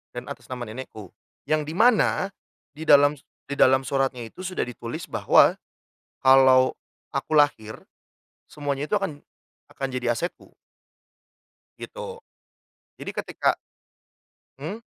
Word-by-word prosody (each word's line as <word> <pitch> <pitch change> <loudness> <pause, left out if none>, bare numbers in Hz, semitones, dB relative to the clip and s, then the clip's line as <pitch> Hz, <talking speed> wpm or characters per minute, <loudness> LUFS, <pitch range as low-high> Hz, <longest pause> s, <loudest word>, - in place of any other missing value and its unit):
dan 125 0 -6
atas 120 - -10
nama 125 -1 -5
nenekku. 110 -4 -9 0.3
Yang 155 -1 0
dimana, 200 +1 +3 0.4
di 155 +3 -9
dalam 145 0 +6 0.3
di 140 - -1
dalam 130 +1 +5
suratnya 135 -2 -1
itu 180 +11 -8
sudah 185 - -2
ditulis 125 +5 -7
bahwa, - - +4 0.6
kalau 130 -1 +6 0.4
aku 155 - +1
lahir, 110 -7 +1 0.7
semuanya 145 0 -3
itu - - 0
akan 195 -8 -2 0.5
akan 135 - -5
jadi 125 -2 -1
asetku 175 +7 -6 1.3
gitu. 475 -1 -8 0.8
Jadi - - -5
ketika - - -1 1.0
Mmm? 175 +10 -5
140 Hz, 110 wpm, -25 LUFS, 130-160 Hz, 1.3 s, dalam